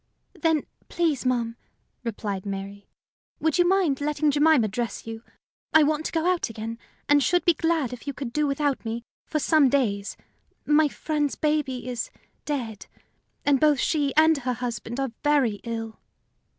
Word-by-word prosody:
"Then, 320 -3 +1 0.2
please, 310 -7 0
ma'am," 235 -2 0 0.5
replied 205 -4 -3
Mary, 200 0 -6 0.5
"would 320 +1 +1
you 350 - +5
mind 355 -8 +2
letting 300 0 +1
Jemima 295 -5 +4
dress 230 +3 -4
you? 225 0 -6 0.5
I 315 - +8
want 305 +1 +1
to - - -7
go 325 0 0
out 360 -6 +1
again, 225 +1 -6 0.3
and 290 0 +5
should 355 +5 +2
be 345 - +6
glad 320 -6 0
if 250 - -10
you 280 - -2
could 260 -5 -5
do 300 +1 +1
without 280 -1 0
me 230 +1 -4 0.2
for 310 - -1
some 305 -2 +4
days. 215 -7 0 0.5
My 300 +1 +4
friend's 295 0 -2
baby 295 -5 -1
is 245 -2 -3 0.4
dead, 240 -8 -4 0.6
and 285 -2 +4
both 300 -2 +4
she 290 -2 +1
and 315 -1 +5
her 250 -1 -1
husband 240 0 -4
are 270 -3 -1
very 275 -8 +2
ill." 225 -1 -5
275 Hz, 165 wpm, -25 LUFS, 230-305 Hz, 0.6 s, I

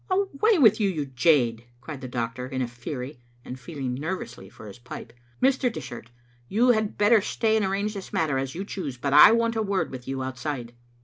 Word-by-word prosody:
"Away 395 +2 +2
with 220 -8 +5
you, 205 -2 +2
you 155 -6 -2
jade," 125 -4 +2
cried 140 +1 -8
the 130 - -6
doctor 120 +1 -4
in 130 0 -2
a - - -2
fury, 125 +2 -7 0.3
and 130 - -7
feeling 135 -2 -5
nervously 130 - -5
for 110 - -14
his 100 - -11
pipe. 120 - -9
" 120 - -15
Mr. 265 -1 +3
Dishart, 120 - -8 0.4
you 235 +5 +3
had 220 -3 +1
better 210 +1 +5
stay 220 +2 0
and 220 - +2
arrange 200 +2 -1
this 195 -3 -8
matter 150 -5 0
as 135 +1 -4
you 190 +3 -4
choose, 155 -11 -5
but 140 +2 -2
I 150 - +10
want 230 0 +1
a 220 - 0
word 200 -2 -1
with 125 -1 -9
you 135 0 -3
outside." 130 -2 -5
150 Hz, 210 wpm, -25 LUFS, 125-210 Hz, 0.4 s, I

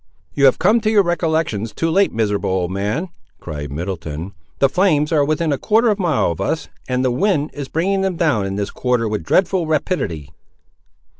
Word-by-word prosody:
"You 140 - +3
have 130 - +5
come 230 +2 +3
to 215 - +1
your 210 -2 +4
recollections 160 - -1
too 165 0 0
late, 195 +4 +3
miserable 105 -3 -1
old 90 -1 -1
man," 105 - -2 0.3
cried 75 -3 -6
Middleton; 85 +1 -5 0.2
"the 135 - +4
flames 150 -2 +2
are 150 -3 +3
within 155 +1 0
a 135 - -3
quarter 225 +2 +3
of 210 - -2
a - - -1
mile 160 - +1
of 80 - -5
us, - - -2 0.2
and 125 0 0
the 130 - +2
wind 155 +1 0
is 140 -2 -6
bringing 190 +7 0
them 190 -2 0
down 145 - +1
in 95 - -4
this 100 0 -3
quarter 125 -3 0
with 105 -5 -3
dreadful 180 - +1
rapidity." 100 - -2
140 Hz, 200 wpm, -19 LUFS, -, 0.3 s, have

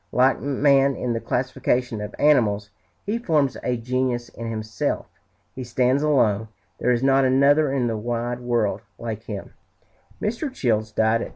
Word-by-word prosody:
Like 130 +1 +3
man 140 -1 +3
in 120 -1 -2
the 115 - -1
classification 125 -2 -1
of 105 0 -6
animals, 105 -9 +2 0.3
he 215 +4 -1
forms 150 - +1
a 125 -1 -1
genus 125 0 -1
in 115 0 -7
himself. 110 -1 -2 0.5
He 130 - -6
stands 125 +3 +1
alone; 115 -8 +2 0.3
there 125 - 0
is 120 +1 +1
not 135 0 +4
another 140 +3 +4
in 135 -3 0
the 115 -2 -1
wide 120 +2 -3
world 120 -4 0 0.2
like 110 -2 -6
him." 100 -3 -7 0.7
Mr. 235 +7 -2
Childs 110 - 0
died 110 +1 +2
at - - -3
3. - - -13
125 Hz, 165 wpm, -23 LUFS, 115-135 Hz, 0.7 s, not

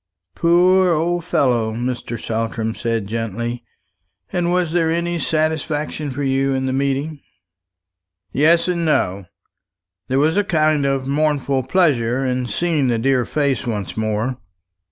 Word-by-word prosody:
"Poor 180 - +4
old 170 +2 0
fellow!" 120 -9 +1
Mr. 120 -1 -3
Saltram 115 0 -2
said 115 -3 -2
gently. 115 +2 -4 0.7
"And 175 -1 0
was 180 -2 +1
there 165 -1 +2
any 170 +1 -1
satisfaction 155 -1 -1
for 140 +2 -4
you 135 0 +1
in 130 0 -1
the 130 - -1
meeting?" 140 +3 -1 1.1
"Yes, 165 +4 +3
and 175 -2 0
no. 100 - 0 0.8
There 130 - 0
was 155 +6 +2
a 205 - +3
kind 155 -6 +2
of 135 -1 -1
mournful 140 -2 0
pleasure 135 -8 +2
in 125 -1 -1
seeing 150 +4 0
the 120 -2 +1
dear 130 +1 +1
face 140 -5 -1
once 105 -5 -3
more." 110 +3 -1
140 Hz, 135 wpm, -20 LUFS, 120-160 Hz, 1.1 s, Poor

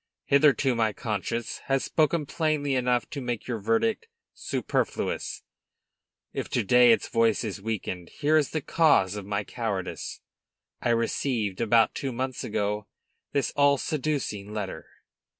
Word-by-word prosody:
"Hitherto, 140 -2 +4
my 110 -2 +1
conscience 110 +2 -3
has 135 -1 +1
spoken 155 0 +1
plainly 150 -2 0
enough 125 -2 +1
to 140 - -4
make 120 -3 -3
your 120 -3 -2
verdict 225 - 0 0.3
superfluous. - - -2 0.9
If - - -4
to 120 - 0
day 125 +3 +6
its 115 - +2
voice 115 -2 +2
is 105 -3 -4
weakened, 95 -5 -4
here 155 +1 +1
is 155 -2 +3
the 155 - -2
cause 135 - +3
of 100 -2 -6
my 105 0 -1
cowardice. 95 - -4 0.6
I - - 0
received, 115 -3 0
about 115 0 +4
two 135 - -3
months 130 +1 -3
ago, 105 -1 -2 0.4
this 140 - 0
all 145 0 +4
seducing 135 -10 -2
letter." 100 -6 -5
120 Hz, 140 wpm, -27 LUFS, 105-140 Hz, 0.9 s, day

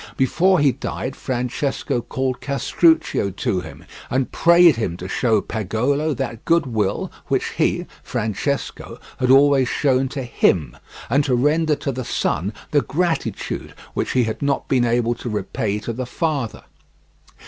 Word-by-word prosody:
Before 175 +8 +3
he 145 -2 +4
died 130 +1 -5
Francesco 125 0 -2
called 130 +1 -3
Castruccio 150 - +2
to 95 0 -1
him, - - -10 0.2
and 130 0 0
prayed 170 -2 +6
him 100 -7 -2
to 90 - -7
show 110 +1 +1
Pagolo 125 +10 -1
that 115 -1 -4
goodwill 135 -11 0 0.2
which - - 0
he - - 0 0.2
(Francesco) 110 +6 -3 0.2
had 125 - +1
always 135 -1 +5
shown 135 -2 +2
to 135 0 -4
HIM, 80 - +1 0.3
and 145 +1 +2
to 130 - +2
render 150 +4 +2
to 140 - -3
the 130 0 -4
son 95 -3 -1 0.2
the 145 - +4
gratitude 165 +8 -2 0.2
which - - -2
he 125 - +3
had 110 -1 -3
not 140 -1 0
been 125 -2 +2
able 120 0 +1
to 120 +1 -6
repay 105 0 -2
to 115 - -4
the 125 +2 -4
father. 145 -5 -2
130 Hz, 150 wpm, -21 LUFS, 115-145 Hz, 0.3 s, prayed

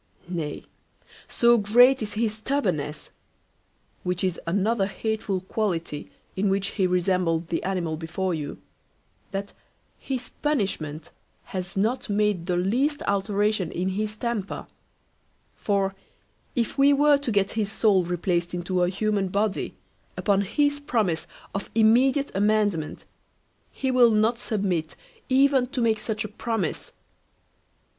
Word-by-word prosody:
Nay, 165 -5 -4 0.7
so 235 0 +4
great 245 +6 +5
is 210 -1 -4
his 220 -1 0
stubbornness 185 - -2 0.9
(which 180 0 -2
is 185 -3 0
another 200 +3 +1
hateful 210 -2 -2
quality 175 -7 -2 0.3
in 195 +1 +1
which 195 0 +1
he 190 -3 +1
resembled 180 -2 +1
the 170 - -1
animal 175 -4 -2
before 175 +3 -2
you) 150 -3 -4 0.7
that 200 0 -5 0.5
his 255 -2 -4
punishment 190 - -1 0.3
has 185 0 -6
not 225 +5 0
made 205 -4 +1
the 180 -1 +1
least 255 +11 +1
alteration 200 -1 +1
in 185 +2 -1
his 215 +2 -3
temper; 225 -4 -3 0.9
for, 195 -2 0 0.6
if 240 +2 -1
we 280 +1 +6
were 290 0 +5
to 280 -4 -2
get 200 -2 +2
his 215 -2 -1
soul 200 -5 +3
replaced 175 0 -1
into 180 +1 -1
a 175 - +3
human 200 0 0
body, 200 +2 -1 0.4
upon 200 -2 +2
his 285 +8 +1
promise 215 - 0 0.3
of 200 -1 -4
immediate 255 +6 +4
amendment, 205 -5 +1 0.7
he 265 -1 -2
will 250 -2 +6
not 220 +2 +2
submit 190 -9 -1 0.3
even 265 -1 +4
to 260 +1 -4
make 225 -2 +2
such 215 -1 -2
a - - -4
promise. 215 -4 -3
200 Hz, 130 wpm, -25 LUFS, 180-230 Hz, 0.9 s, we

